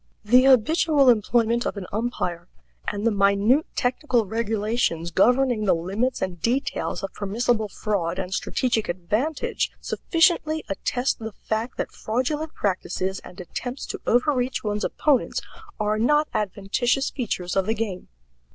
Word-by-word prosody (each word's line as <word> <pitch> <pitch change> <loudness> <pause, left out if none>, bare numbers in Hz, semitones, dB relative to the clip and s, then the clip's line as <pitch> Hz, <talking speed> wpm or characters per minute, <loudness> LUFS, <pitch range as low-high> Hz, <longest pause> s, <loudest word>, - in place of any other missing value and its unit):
The 250 +4 +6
habitual 275 +2 +5
employment 235 +1 +3
of - - -4
an 195 - -5
umpire, 180 -6 -2 0.4
and 205 +1 -2
the 230 - +4
minute 200 +8 +3
technical 250 -2 +1
regulations 215 -5 -1
governing 245 +3 +3
the 190 - +4
limits 200 +10 -1
and 180 -3 -4
details 245 -1 -1
of 195 - -4
permissible 215 +2 0
fraud 190 -5 -2
and 190 -1 -3
strategic 230 +2 0
advantage, 210 - -1
sufficiently 325 -2 +1
attest 245 +7 -1
the 220 -1 -6
fact 220 +4 -3
that - - -3
fraudulent 295 +8 -2
practices 190 -1 -2
and 180 - -13
attempts 245 +8 -5
to - - -6
overreach 250 +1 +1
one's 210 0 -2
opponents 290 -4 +1 0.4
are 215 0 0
not 295 +6 +3
adventitious 215 +6 0
features 195 -8 -3
of 195 0 +1
the 220 - +1
game. 205 -5 -4
225 Hz, 135 wpm, -24 LUFS, 200-255 Hz, 0.4 s, The